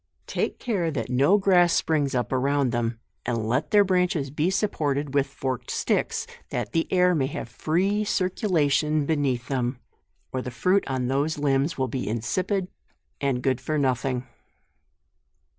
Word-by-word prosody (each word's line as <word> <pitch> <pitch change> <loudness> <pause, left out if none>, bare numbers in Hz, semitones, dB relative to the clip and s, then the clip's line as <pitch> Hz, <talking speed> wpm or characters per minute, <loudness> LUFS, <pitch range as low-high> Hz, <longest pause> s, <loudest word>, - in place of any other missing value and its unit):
Take - - -2
care 195 -9 -1
that 130 -5 -3
no 140 +10 +4
grass 180 -4 +4
springs 145 -4 +1
up 125 - -1
around 135 0 +1
them, 115 -1 -1 0.2
and 115 -3 -2
let 125 +6 0
their 205 -1 +6
branches 180 -7 +1
be 150 +4 +1
supported 150 -8 -1
with 140 -1 +2
forked 130 -2 -4
sticks, - - 0 0.2
that 120 -4 -3
the 165 - -1
air 180 -1 +4
may 140 -5 +1
have 135 - -5
free 185 - 0
circulation 160 - +1
beneath 140 -6 0
them; 125 -2 -1 0.5
or 130 - -2
the 125 - -5
fruit 185 +10 +2
on 130 -2 -1
those 140 +4 0
limbs 140 +1 +1
will 130 -1 0
be 125 -2 -3
insipid 180 - -1 0.5
and 135 -3 0
good 130 -1 +1
for 155 +4 -1
no 135 -3 +3
thing. 125 0 -3
140 Hz, 160 wpm, -25 LUFS, 130-175 Hz, 0.5 s, their